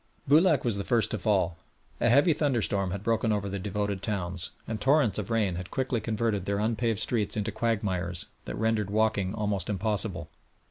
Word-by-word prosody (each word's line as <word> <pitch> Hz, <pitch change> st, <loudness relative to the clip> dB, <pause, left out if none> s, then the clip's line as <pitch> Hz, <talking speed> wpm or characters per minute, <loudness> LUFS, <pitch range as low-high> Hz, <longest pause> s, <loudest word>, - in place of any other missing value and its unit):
Boulac 155 Hz, +1 st, +5 dB
was 115 Hz, -4 st, 0 dB
the -, -, -2 dB
first 115 Hz, +1 st, +1 dB
to 110 Hz, -, -2 dB
fall. 90 Hz, -4 st, +1 dB, 0.4 s
A -, -, +3 dB
heavy 145 Hz, +7 st, +5 dB
thunderstorm 115 Hz, -10 st, 0 dB
had 100 Hz, +2 st, -4 dB
broken 115 Hz, 0 st, +1 dB
over 100 Hz, -1 st, 0 dB
the 100 Hz, 0 st, -3 dB
devoted 100 Hz, 0 st, -2 dB
towns, 90 Hz, -5 st, -2 dB, 0.2 s
and 110 Hz, -1 st, -4 dB
torrents 135 Hz, -7 st, +3 dB
of 100 Hz, -, -5 dB
rain 105 Hz, -6 st, +1 dB
had 90 Hz, 0 st, -6 dB
quickly 130 Hz, -3 st, -1 dB
converted 110 Hz, -2 st, -1 dB
their 100 Hz, 0 st, 0 dB
unpaved 115 Hz, +1 st, 0 dB
streets 105 Hz, 0 st, 0 dB
into 105 Hz, -, -1 dB
quagmires, 95 Hz, -6 st, -1 dB, 0.2 s
that -, -, -5 dB
rendered 110 Hz, -2 st, 0 dB
walking 105 Hz, -2 st, +1 dB
almost 105 Hz, -4 st, -1 dB
impossible. 100 Hz, -4 st, -1 dB
105 Hz, 180 wpm, -28 LUFS, 100-115 Hz, 0.4 s, Boulac